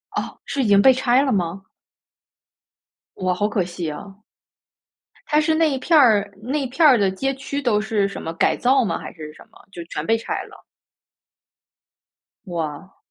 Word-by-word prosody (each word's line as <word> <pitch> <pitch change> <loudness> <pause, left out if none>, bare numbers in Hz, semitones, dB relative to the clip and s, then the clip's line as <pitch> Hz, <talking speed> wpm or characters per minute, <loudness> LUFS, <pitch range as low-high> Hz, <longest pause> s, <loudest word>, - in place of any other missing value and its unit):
哦， - - -4
是 275 - -2
已 - - 0
经 200 -1 +5
被 265 +5 +7
拆 250 0 +2
了 270 - 0
吗？ 185 -2 -2 1.5
哇， 185 -1 0
好 205 +3 0
可 205 -3 0
惜 175 -2 -5
啊。 195 +6 -10 1.1
它 300 0 +3
是 315 +1 +1
那 320 0 +3
一 270 - -2
片 315 +5 +2
儿 210 -6 +4
那 260 +7 -2
一 - - -2
片 300 +5 +3
儿 260 - +6
的 195 -3 +1
街 270 +8 -2
区 280 +1 -5
都 215 -5 +1
是 210 -2 0
什 200 - -8
么？ 165 - -5
改 - - +2
造 260 +1 +2
吗？ 170 - -2
还 - - -8
是 155 -2 -10
什 - - -16
么？ - - -20
就 170 - -7
全 155 -2 -5
被 225 +4 +2
拆 225 - -4
了。 - - -16 1.8
哇。 165 0 -6
210 Hz, 195 characters per minute, -21 LUFS, 185-265 Hz, 1.8 s, 被